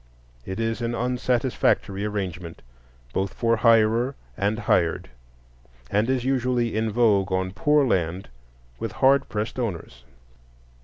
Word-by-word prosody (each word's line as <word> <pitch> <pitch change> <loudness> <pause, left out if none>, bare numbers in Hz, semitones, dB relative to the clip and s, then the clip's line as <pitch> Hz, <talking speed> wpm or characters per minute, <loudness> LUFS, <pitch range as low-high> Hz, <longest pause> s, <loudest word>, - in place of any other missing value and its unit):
It 95 +3 -5
is 115 +1 -1
an 120 0 -2
unsatisfactory 125 -4 0
arrangement, 90 -5 -5 0.5
both 95 0 -2
for 115 -1 +1
hirer 115 +3 +3 0.2
and 105 +2 0
hired, 90 - 0 0.8
and 105 +4 +1
is 130 -2 0
usually 125 -3 0
in 110 0 0
vogue 105 -4 +2
on 95 0 -1
poor 145 +8 +2
land 90 -4 -1 0.5
with - - -4
hard 135 +1 +3
pressed 110 +3 -3
owners. 85 - -5
110 Hz, 120 wpm, -24 LUFS, 95-120 Hz, 0.8 s, hirer